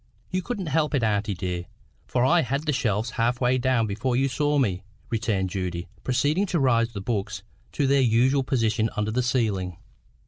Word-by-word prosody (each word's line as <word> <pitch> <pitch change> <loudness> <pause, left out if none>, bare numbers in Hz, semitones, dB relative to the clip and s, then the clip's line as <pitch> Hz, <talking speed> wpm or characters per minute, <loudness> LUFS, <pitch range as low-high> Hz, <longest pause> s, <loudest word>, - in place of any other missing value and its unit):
"You 185 0 0
couldn't 200 -1 -4
help 155 0 +1
it, 130 - +1
auntie, 105 -1 0
dear; 90 0 -3 0.4
for 125 0 +1
I 170 +5 +4
had 140 +2 -2
the 150 - +1
shelf 115 -3 0
half 120 0 0
way 125 0 +2
down 125 -2 +2
before 110 +5 -1
you 135 +2 +2
saw 145 +3 +1
me," 100 -9 +1 0.3
returned 105 -5 0
Judy, 90 -2 -3
proceeding 150 +10 +1
to 175 - 0
raise 120 -3 +2
the 100 - -5
books 100 -2 -3 0.3
to 145 - +1
their 135 0 +4
usual 125 +3 +3
position 115 -4 +1
under 105 +1 0
the 125 +3 +1
ceiling. 105 -8 0
120 Hz, 185 wpm, -25 LUFS, 105-135 Hz, 0.4 s, I